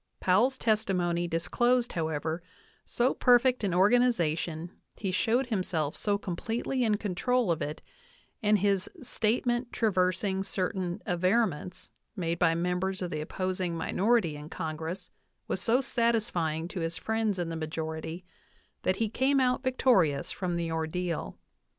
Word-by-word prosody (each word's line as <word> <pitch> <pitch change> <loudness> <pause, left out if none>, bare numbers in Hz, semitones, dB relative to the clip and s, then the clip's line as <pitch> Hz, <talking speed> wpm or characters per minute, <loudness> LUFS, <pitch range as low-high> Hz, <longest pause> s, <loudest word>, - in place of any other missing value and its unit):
Powell's 230 +9 +3
testimony 180 -7 +1
disclosed, 240 +9 +1
however, 160 0 -2 0.4
so 245 +2 +2
perfect 250 -1 +4
an 200 - +1
Organization, 175 -5 +2 0.2
he 195 -3 -3
showed 230 +8 +2
himself 180 - -1
so 205 -1 0
completely 225 +7 -2
in 215 -3 +2
control 215 +2 0
of 165 - -1
it, 150 +2 -4 0.6
and 210 -1 +4
his 200 -1 +1
"statement 240 +2 0
traversing 190 -2 +1
cer 185 -1 -1
tain 180 -2 -4
averments" 185 -1 0 0.2
made 170 -3 -2
by 165 -2 +4
members 180 +2 -1
of 180 - -4
the 155 - -2
opposing 185 +1 -2
minority 200 -2 +1
in 150 +1 -9
Congress 160 +4 -5 0.4
was 185 - -2
so 240 +5 +3
satisfying 215 - 0
to 180 - -5
his 165 0 -2
friends 220 -2 0
in 175 -2 -2
the 165 - -4
majority, 160 +2 -4 0.6
that 185 - +1
he 225 +2 0
came 265 +5 +2
out 250 -1 +2
victorious 235 - +2
from 180 -2 -2
the 170 -1 -2
ordeal. 160 - -2
185 Hz, 140 wpm, -29 LUFS, 170-225 Hz, 0.6 s, perfect